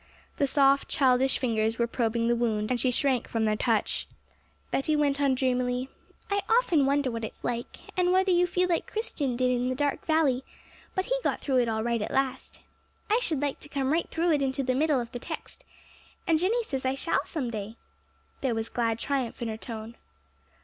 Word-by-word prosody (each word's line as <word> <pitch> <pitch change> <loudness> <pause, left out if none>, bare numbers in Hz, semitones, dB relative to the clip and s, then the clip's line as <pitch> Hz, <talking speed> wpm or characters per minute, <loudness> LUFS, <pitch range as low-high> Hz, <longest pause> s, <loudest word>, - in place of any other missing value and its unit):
The 280 - +2
soft, 275 0 +4
childish 265 -2 +3
fingers 225 -3 0
were 235 - +2
probing 230 -1 0
the 240 - +3
wound, 220 -2 0
and 245 - +1
she 255 - +2
shrank 255 0 +1
from 225 -1 0
their 215 0 +2
touch. 225 -1 0 0.6
Betty 305 +3 +1
went 285 -1 +1
on 275 -2 +3
dreamily, 250 0 0 0.4
'I 405 0 +2
often 360 - +4
wonder 280 -2 +1
what 230 -1 -4
it's 220 - -7
like, 240 0 -3 0.2
and 360 -1 +2
whether 375 +1 +3
you 355 0 +4
feel 365 0 +1
like 340 -2 -1
Christian 295 - -2
did 250 +1 +2
in 250 0 0
the 255 - -1
dark 285 +1 -1
valley; 300 -5 +2 0.5
but 375 -1 0
he - - 0
got - - 0
through 270 -3 0
it 240 -2 +3
all 220 0 -1
right 235 -1 0
at - - -2
last! 270 -1 -2 0.5
I 450 - +5
should 310 - -1
like 285 -2 -1
to 295 - -13
come 275 0 0
right 335 - 0
through 335 +1 +1
it 295 -2 +2
into 270 0 0
the 255 0 +1
middle 290 +1 +2
of 235 -1 -5
the 245 - -5
text, - - -8 0.6
and 325 -4 +3
Jenny 445 +7 +1
says 270 -10 -4
I 260 +1 0
shall 275 - 0
some 265 -8 -3
day!' 215 0 -5 0.7
There 255 -4 0
was 225 0 -3
glad 230 -2 0
triumph 265 -1 -2
in 230 - -2
her 220 - -3
tone. 225 0 -7
265 Hz, 210 wpm, -28 LUFS, 235-300 Hz, 0.7 s, I